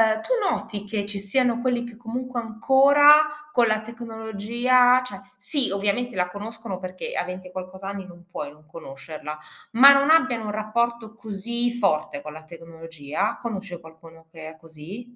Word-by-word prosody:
uhm, 220 - -6
tu - - -7
noti 210 - -2
che 205 -1 -3
ci 205 -1 -4
siano 240 +4 +1
quelli 245 -1 0
che 235 -2 -10
comunque 240 +1 -5
ancora 280 +6 +5 0.3
con 240 -2 +4
la 215 0 +1
tecnologia 235 +2 +1
cioè 200 -6 -9 0.2
sì, 285 -4 +1
ovviamente 205 +5 -1
la 180 0 +1
conoscono 210 0 -7
perché 185 0 -6
a - - -1
20 180 +1 -7
e 180 - -14
qualcos'anni 190 +1 -7
non 175 -1 -15
puoi 145 -4 -6
non 150 +1 -21
conoscerla, 150 -1 -9 0.4
ma 275 +4 +9
non 280 +2 +3
abbiano 260 -8 +3
un 210 - -3
rapporto 225 +1 -2
così 235 +2 -3
forte 155 -11 0
con 150 0 -9
la 160 +1 -11
tecnologia? 165 +1 -5
Conosci 200 -6 -5
qualcuno 165 0 -16
che 160 -2 -9
è 160 - -14
così 170 +10 -11
210 Hz, 165 wpm, -24 LUFS, 175-240 Hz, 0.4 s, ma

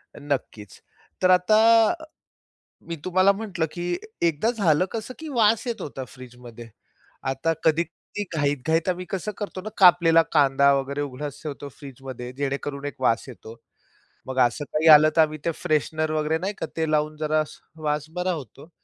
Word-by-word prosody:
नक्कीच, 135 -8 -5 0.4
तर 185 0 +4
आता 180 +4 +4 0.3
अ, 320 -2 -7 0.8
मी 170 - -5
तुम्हाला 185 +2 +4
म्हटलं 195 -6 -3
की 175 - -5 0.4
एकदा 165 +9 0
झालं 185 -8 +2
कसं, 225 +2 -5
की 320 -1 -7
वास 225 -3 +2
येत 235 - -3
होता 135 -2 -6
फ्रीजमध्ये. 120 -2 -12 0.5
आता 135 +5 -1
कधी-कधी 170 +5 -1
घाईत-घाईत 150 +4 0
आम्ही 180 0 -2
कसं 195 +2 -3
करतो 195 -2 -5
ना, 215 - -6
कापलेला 170 -3 +6
कांदा 140 -1 +4
वगैरे 140 +1 -2
उघडाच 145 0 -6
ठेवतो 145 -1 -6
फ्रीजमध्ये, 130 -3 -8
जेणेकरून 140 0 -3
एक 145 -2 -7
वास 115 -3 +2
येतो. 115 -2 -11 0.7
मग 130 0 -3
असं 145 +5 -6
काही 155 +2 +1
आलं, 155 +1 +7
तर - - +8
आम्ही 155 0 +1
ते 170 - +2
फ्रेशनर 155 +1 0
वगैरे 155 +1 0
नाही 195 +3 -3
का - - -3
ते 160 -1 0
लावून 155 0 0
जरा 155 0 +1
स - - -14 0.2
वास 150 0 -1
बरा 180 +1 0
होतो. 145 - -8
155 Hz, 160 wpm, -24 LUFS, 140-180 Hz, 0.8 s, तर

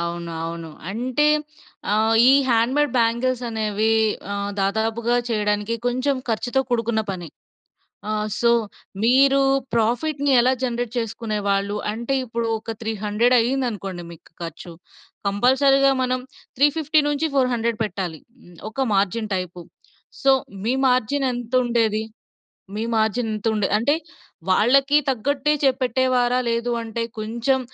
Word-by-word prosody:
అవును. 170 0 -4
అవును. 165 -1 -6 0.2
అంటే, 255 +7 0 0.7
ఆహ్, 220 +1 +3 0.2
ఈ - - +7 0.2
హ్యాండ్‌మేడ్ 250 +5 +2
బ్యాంగిల్స్ 235 +2 +1
అనేవి 220 0 0 0.4
ఆహ్, 200 0 -3
దాదాపుగా 225 +4 0
చేయడానికి 210 0 0
కొంచెం 255 +3 0
ఖర్చుతో 245 +4 0
కూడుకున్న 230 -2 0
పని. 175 -4 -6 0.8
ఆహ్, 215 0 -1
సో, 235 0 +4 0.5
‌మీరు 270 +3 +5 0.3
ప్రాఫిట్‌ని 275 +6 +1
ఎలా 255 +2 +3
జనరేట్ 240 -2 -2
చేసుకునేవాళ్ళు? 205 -3 -2 0.2
అంటే 235 +4 -3
ఇప్పుడు 230 -1 -3
ఒక 225 0 -6
300 220 +2 +1
అయిందనుకోండి 225 -8 -2
మీకు 165 - -15
ఖర్చు. 170 +1 -8 0.5
కంపల్సరీ‌గా 270 +6 +4
మనం 255 0 0 0.4
350-400 285 -5 +1
పెట్టాలి, 185 -6 -4 0.5
ఒక 270 - -3
మార్జిన్ 205 +2 0
టైపు. 180 -1 -5 0.6
సో, 270 - +6 0.3
మీ 235 +4 +1
మార్జిన్ 255 +3 +1
ఎంతుండేది? 235 -3 0 0.7
మీ 215 - -3
మార్జిన్ 220 +1 +1
ఎంత 215 +1 -3
ఉండే 210 -3 0
అంటే 235 +7 +2 0.6
వాళ్ళకీ 275 +9 +4
తగ్గట్టే 275 +3 +1
చే 275 - +5
పెట్టేవారా? 250 0 +2
లేదు 235 +1 0
అంటే, 230 0 -4 0.2
కొంచెం 235 +5 0
230 Hz, 110 wpm, -22 LUFS, 210-255 Hz, 0.8 s, ఈ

